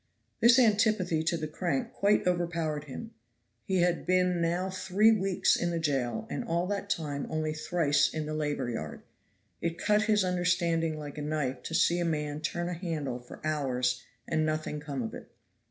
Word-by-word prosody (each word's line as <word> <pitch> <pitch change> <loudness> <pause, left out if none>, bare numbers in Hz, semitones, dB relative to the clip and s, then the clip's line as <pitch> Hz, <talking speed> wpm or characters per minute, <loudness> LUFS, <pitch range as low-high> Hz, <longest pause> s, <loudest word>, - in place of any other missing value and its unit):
This 235 +2 +7
antipathy 210 -8 +3
to 170 +1 +1
the 155 -1 -3
crank 195 +10 -2
quite 205 -1 +2
overpowered 170 -4 -1
him. 220 - -7 0.5
He 190 -3 +1
had 175 -1 +1
been 180 -1 +2
now 175 +3 0
three 190 +4 +3
weeks 195 -4 +2
in 175 - 0
the 170 - -1
jail, 145 - -1
and 245 - -3
all 175 -6 0
that 200 0 -3
time 145 -6 -2
only 155 -1 -1
thrice 155 -2 +2
in 155 -1 -3
the 155 - -4
labor 145 -4 -1
yard. 80 -10 -6 0.6
It 170 0 -2
cut 210 0 +2
his 210 -2 +3
understanding 175 -3 +1
like 150 -1 -7
a - - -4
knife 145 -3 -2
to 165 - -4
see 175 +1 +3
a - - +1
man 150 -2 -2
turn 175 +2 -2
a 180 - -2
handle 160 -8 -3
for 125 +5 -12
hours 130 -5 0 0.3
and 155 - +1
nothing 155 -1 -2
come 140 -4 -4
of 110 - -5
it. - - -9
165 Hz, 185 wpm, -29 LUFS, 150-185 Hz, 0.6 s, This